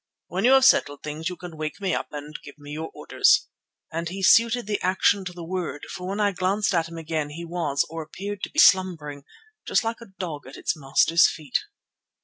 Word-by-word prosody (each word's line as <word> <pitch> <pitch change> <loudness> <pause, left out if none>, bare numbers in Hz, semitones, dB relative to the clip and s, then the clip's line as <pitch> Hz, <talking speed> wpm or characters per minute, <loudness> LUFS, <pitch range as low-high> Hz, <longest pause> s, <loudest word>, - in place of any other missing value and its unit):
When - - -1
you 255 - +6
have 265 -1 +6
settled 145 - +3
things, 155 +2 -4
you 180 - -7
can 175 -2 -9
wake 155 +3 -4
me 190 -3 -1
up - - -2
and 150 0 -7
give 145 - -12
me 145 0 -11
your 160 +2 -5
orders," - - +3 0.5
and 165 +1 -3
he 190 +2 -6
suited 230 +4 +5
the 210 0 -2
action 190 +2 +2
to 180 - -4
the 175 -1 -9
word, 175 -3 -4
for 180 0 -6
when 200 +2 -3
I 205 -1 +3
glanced 195 +3 0
at 165 -2 +1
him 165 - -9
again 155 -2 -3
he 170 +3 -7
was, 165 -5 -1
or 165 +1 -6
appeared 200 +5 -7
to - - -3
be, - - -15
slumbering, 160 - +3 0.4
just - - +2
like 225 +1 -3
a 230 - -11
dog 155 -7 -5
at 135 - -10
its - - -1
master's 155 +3 +4
feet. 155 -3 -2
170 Hz, 220 wpm, -25 LUFS, 155-195 Hz, 0.5 s, you